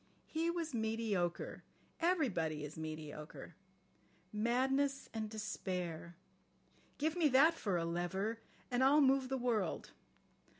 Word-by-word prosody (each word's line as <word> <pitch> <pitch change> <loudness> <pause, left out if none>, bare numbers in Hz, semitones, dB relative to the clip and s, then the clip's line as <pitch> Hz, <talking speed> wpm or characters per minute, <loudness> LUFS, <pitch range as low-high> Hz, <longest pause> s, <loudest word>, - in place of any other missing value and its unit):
He 325 +1 -1
was 335 -3 -2
mediocre. 220 -6 -1 0.4
Everybody 195 - +1
is 150 - -8
mediocre. 155 -1 -7 0.8
Madness 265 +5 +1
and 220 -1 -3
despair! 180 -6 -4 0.8
Give 310 +2 0
me 340 -3 +4
that 285 +5 +6
for 205 - -1
a 165 - 0
lever, 190 +6 -1 0.3
and 245 +1 +3
I'll 280 +3 +6
move 270 -1 +4
the 265 - 0
world. 230 -8 -1
220 Hz, 115 wpm, -36 LUFS, 175-275 Hz, 0.8 s, that